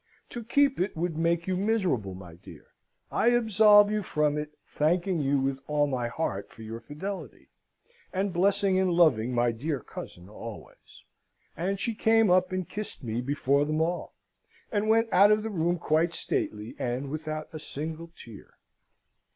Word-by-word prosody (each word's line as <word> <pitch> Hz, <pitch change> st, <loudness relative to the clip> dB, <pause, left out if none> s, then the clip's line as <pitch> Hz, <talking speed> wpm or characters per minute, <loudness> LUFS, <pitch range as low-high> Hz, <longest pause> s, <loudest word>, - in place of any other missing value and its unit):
To 240 Hz, -, -6 dB
keep 275 Hz, +4 st, +2 dB
it 185 Hz, -1 st, -1 dB
would 170 Hz, 0 st, -1 dB
make 170 Hz, +1 st, +1 dB
you 185 Hz, -, -1 dB
miserable, 180 Hz, -, 0 dB
my 90 Hz, -2 st, -11 dB
dear. 85 Hz, -, -14 dB, 0.5 s
I -, -, +1 dB
absolve 215 Hz, -3 st, +6 dB
you 215 Hz, 0 st, 0 dB
from 150 Hz, -5 st, 0 dB
it, 150 Hz, 0 st, -3 dB, 0.2 s
thanking 170 Hz, +3 st, 0 dB
you 140 Hz, -1 st, +1 dB
with 135 Hz, 0 st, -1 dB
all 150 Hz, -1 st, +2 dB
my 130 Hz, -4 st, -2 dB
heart 120 Hz, -6 st, -3 dB
for 115 Hz, -, -13 dB
your 110 Hz, +1 st, -6 dB
fidelity, 155 Hz, -, -7 dB, 0.6 s
and 195 Hz, 0 st, -1 dB
blessing 190 Hz, +1 st, +2 dB
and 190 Hz, -1 st, +2 dB
loving 145 Hz, -9 st, +3 dB
my 120 Hz, -1 st, +2 dB
dear 140 Hz, +5 st, -3 dB
cousin 90 Hz, -5 st, -10 dB
always.' 110 Hz, +1 st, -11 dB, 0.5 s
And 190 Hz, +4 st, -2 dB
she 230 Hz, -, -1 dB
came 225 Hz, -2 st, +3 dB
up 185 Hz, 0 st, +3 dB
and 185 Hz, -2 st, -2 dB
kissed 210 Hz, -7 st, -7 dB
me 115 Hz, 0 st, -2 dB
before 140 Hz, +1 st, +1 dB
them 155 Hz, +1 st, -1 dB
all, 170 Hz, +2 st, -2 dB, 0.6 s
and 210 Hz, 0 st, 0 dB
went 225 Hz, +1 st, +4 dB
out 200 Hz, +2 st, +7 dB
of 210 Hz, 0 st, +3 dB
the 220 Hz, -, -4 dB
room 175 Hz, -1 st, 0 dB
quite 165 Hz, +1 st, +1 dB
stately, 110 Hz, -10 st, -3 dB
and 130 Hz, +3 st, -3 dB
without 155 Hz, 0 st, -5 dB
a 155 Hz, -, -6 dB
single 160 Hz, +3 st, -6 dB
tear. 110 Hz, -4 st, -13 dB
165 Hz, 165 wpm, -28 LUFS, 135-195 Hz, 0.6 s, out